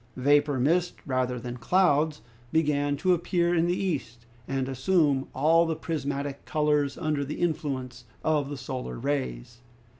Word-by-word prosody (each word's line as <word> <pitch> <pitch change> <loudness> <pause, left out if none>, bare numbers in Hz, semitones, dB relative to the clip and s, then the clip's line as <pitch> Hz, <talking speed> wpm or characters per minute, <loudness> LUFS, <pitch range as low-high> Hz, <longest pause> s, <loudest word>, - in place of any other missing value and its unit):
Vapor 145 +1 +3
mist 170 +7 +2
rather 130 -2 -1
than 120 +1 -6
clouds 155 - +2 0.3
began 145 -2 +1
to 185 +2 +3
appear 175 0 +1
in 170 0 +2
the 175 +1 +1
east, 125 - -3 0.2
and 135 -1 -1
assume 135 0 +2
all 165 +4 +3
the 165 - -1
prismatic 140 -3 -3
colors 150 -2 +1
under 150 -2 -1
the 140 +2 -5
influence 135 -7 -2 0.2
of 150 -3 +1
the 145 - -5
solar 130 0 -5
rays. 120 - -3
145 Hz, 145 wpm, -27 LUFS, 130-160 Hz, 0.3 s, Vapor